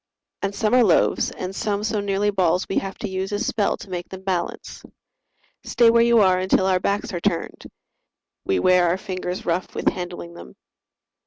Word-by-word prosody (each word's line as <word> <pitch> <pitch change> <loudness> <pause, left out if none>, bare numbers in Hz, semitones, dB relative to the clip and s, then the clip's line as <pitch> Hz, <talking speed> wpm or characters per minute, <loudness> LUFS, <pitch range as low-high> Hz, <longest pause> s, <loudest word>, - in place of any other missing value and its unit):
And 200 0 -2
some 215 +2 0
are 250 -1 +6
loaves 190 -7 +2
and 185 +1 -6
some 205 0 -2
so 220 -1 -1
nearly 200 +1 0
balls 185 -2 +1
We 195 - 0
have 195 -1 -7
to - - -4
use 190 +1 -4
a 205 - -1
spell 205 0 0
to - - -12
make 175 -1 -5
them 190 0 -9
balance: 185 -3 -4 0.8
"Stay 235 -1 +4
where 235 0 +4
you 235 -1 +5
are 185 -2 +4
until 190 0 +2
our 185 -1 +2
backs 205 +4 -2
are 175 - -2
turned!" 175 -4 -2 0.8
We 95 - 0
wear 180 - +4
our 170 +2 +1
fingers 185 -1 -5
rough 175 +2 -2
with - - +2
handling 175 -1 -7
them. 65 - -12
190 Hz, 190 wpm, -22 LUFS, 180-205 Hz, 0.8 s, are